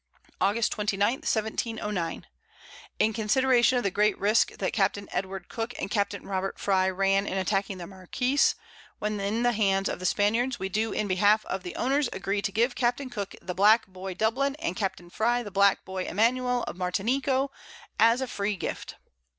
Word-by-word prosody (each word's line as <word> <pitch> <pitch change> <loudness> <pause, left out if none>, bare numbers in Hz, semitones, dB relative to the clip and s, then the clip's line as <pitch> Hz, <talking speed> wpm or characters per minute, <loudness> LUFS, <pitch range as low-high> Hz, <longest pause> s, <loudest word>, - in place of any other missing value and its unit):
August 215 +3 +2
29. 205 +1 +1
1709. 215 -6 -2 0.7
In 220 - +2
consideration 250 +3 +3
of 245 - 0
the 195 - 0
great 210 +1 +2
Risque 210 +3 +2
that - - -2
Capt. 205 -3 +2
Edward 190 -2 -4
Cooke 230 +1 -5
and 195 - -4
Capt. 205 -2 0
Robert 195 0 -3
Frye 190 -1 +2
ran 195 +1 +1
in 195 - -2
attacking 195 0 -1
the 175 - -7
Marquiss, 250 +10 +1 0.4
when 210 0 -2
in 210 +4 -1
the 245 - +4
Hands 195 -3 +1
of - - -3
the 185 - -1
Spaniards, 230 +7 +1
we 190 +1 -3
do 215 +3 -1
in 210 - -1
behalf 205 +3 +3
of 190 - -3
the 180 - -7
Owners 275 +2 +1
agree 195 +2 -2
to 200 - -2
give 235 +5 +1
Capt. 250 +2 -1
Cooke 200 -4 -5
the 180 - -4
Black 210 +5 +5
Boy 185 0 -7
Dublin, 260 +7 +1
and 185 - -3
Capt. 190 -2 -2
Frye 240 +4 +1
the 205 - -8
Black 200 0 +3
Boy 190 -1 -4
Emanuel 245 +4 +1
of - - -6
Martineco, 260 +9 0 0.5
_as 230 +3 +5
a 260 - -2
free 205 -3 -2
Gift. 180 - -5
210 Hz, 180 wpm, -27 LUFS, 195-240 Hz, 0.7 s, Black